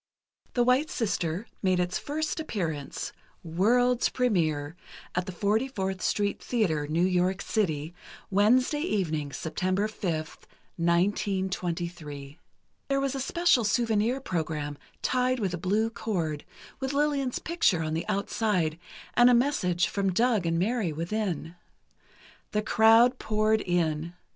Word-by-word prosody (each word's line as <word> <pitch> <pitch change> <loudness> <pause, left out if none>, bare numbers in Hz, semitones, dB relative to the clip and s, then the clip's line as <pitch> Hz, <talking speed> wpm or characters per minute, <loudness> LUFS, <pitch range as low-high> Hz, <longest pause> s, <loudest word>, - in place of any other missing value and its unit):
"The 245 - +4
White 255 +5 +3
Sister" 190 -4 -1 0.2
made 185 -2 +2
its 180 0 0
first 310 +2 -3
appearance, 165 - -4 0.3
"World's 235 +9 +2
Premiere," 160 - 0 0.4
at 180 0 -1
the - - -3
44th 200 0 -1
Street 205 -1 0
Theatre, 165 -12 0
New 165 +4 +2
York 185 +1 +1
City, 160 -9 -1 0.4
Wednesday 245 +9 +3
evening, 160 - -1
September 185 +7 -1
5, 205 -4 -3 0.7
1923. 170 -4 -1 0.5
There 275 0 +1
was 275 -1 0
a 270 - -3
special 340 -1 +2
souvenir 225 +2 +1
program, 155 - -3 0.3
tied 255 0 +1
with 195 -5 -1
a 175 - -3
blue 210 +6 +1
cord, 175 -9 -3 0.3
with 265 0 -2
Lillian's 280 -3 +1
picture 260 - +1
on 155 0 -2
the 165 - -2
outside 195 -5 0 0.3
and 240 0 +6
a 245 - +6
message 185 -9 +2
from 195 -1 0
Doug 220 -2 +2
and 165 0 +1
Mary 205 0 0
within. 170 0 -3 1.0
The 210 0 +1
crowd 225 +4 +5
poured 215 0 +1
in. 170 -1 -1
195 Hz, 125 wpm, -28 LUFS, 170-240 Hz, 1.0 s, and